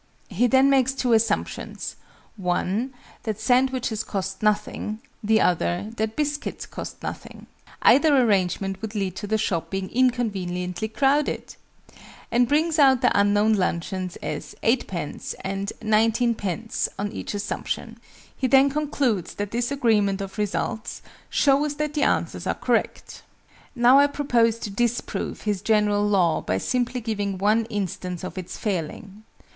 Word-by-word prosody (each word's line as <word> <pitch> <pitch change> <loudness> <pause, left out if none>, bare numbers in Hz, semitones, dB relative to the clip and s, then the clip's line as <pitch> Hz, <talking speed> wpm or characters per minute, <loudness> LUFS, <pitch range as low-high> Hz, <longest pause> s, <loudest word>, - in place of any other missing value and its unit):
He 220 +5 +2
then 265 +2 +5
makes 265 -1 +3
two 250 -3 +1
assumptions 225 0 -1 0.4
one, 195 +5 -1 0.3
that 220 -2 -4
sandwiches 250 -1 +1
cost 190 -1 -4
nothing; 210 0 0 0.3
the 220 +1 +3
other, 180 +3 +1
that 220 0 -1
biscuits 295 -1 -2
cost - - -8
nothing, - - -7 0.4
(either 285 0 +6
arrangement 195 -4 +1
would 220 0 -6
lead 195 -3 -2
to 205 - -5
the 220 +1 +1
shop 185 -6 -1
being 195 -1 -4
inconveniently 205 -7 0
crowded!) 275 +6 0 0.8
and 245 0 +3
brings 315 +3 +2
out 265 -3 +6
the - - +3
unknown 205 +2 +4
luncheons 185 -1 -1
as - - -5
8_d._ 195 - -1
and 195 +1 -3
19_d._, 220 -1 +1
on 205 +1 -2
each 220 - -5
assumption. 205 0 -4 0.4
He 260 - 0
then 270 +2 +5
concludes 275 - -1
that 205 0 -4
this 240 +1 -1
agreement 215 -8 +2
of 195 +2 -6
results 210 +1 -3 0.3
"shows 285 +1 +2
that 300 0 -2
the 300 - -1
answers - - 0
are - - 0
correct." - - -1 0.5
Now 250 +2 +6
I 285 - +6
propose 240 -6 +2
to 205 - -4
disprove 240 +3 -2
his 205 -3 -1
general 210 -1 +2
law 180 -5 +2
by 95 - -1
simply 250 - -1
giving 205 -3 -2
one 215 +4 +2
instance 190 -4 -4
of 185 - -5
its 180 - -7
failing. 200 +2 -4
215 Hz, 140 wpm, -24 LUFS, 195-250 Hz, 0.8 s, either